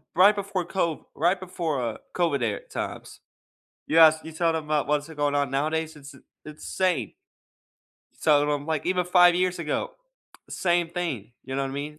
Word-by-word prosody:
right 195 +4 +6
before 200 -3 -3
COV 170 -3 -2
right 175 +4 +2
before, 175 -7 -3
uh, 115 -2 -3 0.2
COVID 165 -6 +1
er 105 -3 -1
times. - - -6 0.7
You 165 - +3
ask 160 0 +7
you 160 - -7
tell 165 +1 +1
them 160 -1 -3
about 150 -2 0
what's 150 0 0
going 145 -2 -1
on, 140 -2 0
nowadays? 155 +3 -1
It's 145 -1 -12
it's - - -17 0.2
it's 155 0 -9
insane. 180 - +1 1.1
So, 150 -2 +4
then 145 - 0
I'm, 145 -1 -1
like 160 -2 -2
even 180 0 +1
5 175 0 +6
years 180 0 0
ago 155 -3 -2 0.6
same 175 -2 0
thing, 165 - -4
you 130 0 -5
know 135 - 0
what 135 - -3
I - - -7
mean? 150 +2 -5
160 Hz, 190 wpm, -25 LUFS, 145-175 Hz, 1.1 s, ask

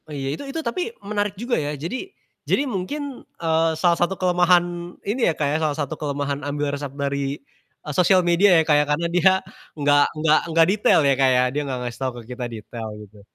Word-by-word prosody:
Oh - - -8
iya. 135 0 -2
Itu 155 - -6
itu 325 - -4
tapi 235 +10 -2 0.2
menarik 205 -1 -2
juga 240 +3 -1
ya. 145 - -2
Jadi 240 - -5 0.4
jadi 285 - +2
mungkin, 265 +5 -4 0.2
eee, 165 0 +1
salah 170 +1 +3
satu 180 +2 +1
kelemahan 175 -1 +1
ini 220 +3 +1
ya - - +1
Kak 150 - 0
ya, - - +2
salah 150 -2 0
satu 145 -1 -2
kelemahan 145 -1 -3
ambil 145 0 -2
resep 145 0 -4
dari, 140 0 -2 0.5
e - - -6
sosial 185 +3 +4
media 175 +4 +4
ya - - +5
Kak 150 -1 +4
ya, - - +2
karena 150 +3 0
dia 180 +2 +5 0.5
enggak 145 0 +4
enggak 155 0 +4
enggak 165 0 +5
detail 210 -5 +4
ya 140 - +4
Kak 135 0 +3
ya, 125 - +4
dia 150 - -1
gak 130 -1 -3
ngasih 120 -1 -6
tau 130 -1 0
ke - - -7
kita 125 0 -5
detail 115 0 -7
gitu. 105 -1 -14
160 Hz, 215 wpm, -22 LUFS, 140-185 Hz, 0.5 s, ya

